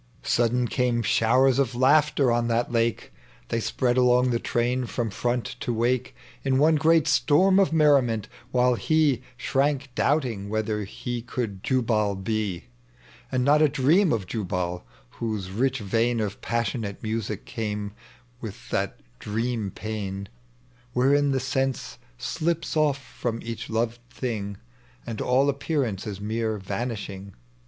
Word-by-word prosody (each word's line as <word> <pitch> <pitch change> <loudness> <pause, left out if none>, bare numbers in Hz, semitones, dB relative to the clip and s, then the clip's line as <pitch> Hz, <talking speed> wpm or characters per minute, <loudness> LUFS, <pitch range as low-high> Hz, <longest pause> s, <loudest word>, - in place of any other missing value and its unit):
Sudden 120 +1 +2
came 120 -1 0
showers 125 +5 +3
of 130 -3 +1
laughter 140 0 +4
on 120 0 +1
that 120 +1 0
lake; 115 -1 0 0.4
They 115 - 0
spread 120 +2 0
along 125 0 +4
the 115 - +1
train 125 +2 0
tVom 115 -3 -2
iVont 120 +3 -2
to - - -2
wake 120 +2 0 0.3
In 135 -1 +2
one 155 +3 +4
great 160 0 +4
itorm 185 +5 +4
of 190 - +2
merriment, 135 -9 +3 0.2
while 125 0 +3
he 145 -1 +2 0.2
Shrank 140 +1 0
doubting 125 -9 0
whithei 110 -1 -1
he 120 +3 -4
could 115 -5 -4
Jubal 110 -5 +1
be. 100 -2 -2 0.7
And 125 -1 +1
not 150 +2 +5
a 155 - +5
dieam 155 +8 +3
ot 105 -5 0
Jubal, 90 -4 -3 0.3
whose 105 -5 -3
rich 130 +6 +1
vein 115 +2 0
Of 105 -1 -3
passionate 115 -2 -2
musn, 110 -1 -2
came 105 -2 -3 0.5
with 115 +2 -8
that 100 -1 -1 0.2
dream 115 0 -2
pain. 100 -2 -5 0.6
Wherein 140 +3 +3
the 135 -1 +1
sen=ie 135 0 -2 0.2
thps 165 0 -2
off 150 -3 +3
from 120 -3 -4
each 115 -1 -6
lo? 115 +1 +1 0.2
thing. 110 -6 -4 0.5
And 115 -2 -5
all 130 +3 +3
appearance 140 - -1
is 100 -2 -5
mere 110 +1 -1
vanishing. 100 -1 -5
120 Hz, 140 wpm, -25 LUFS, 110-135 Hz, 0.7 s, not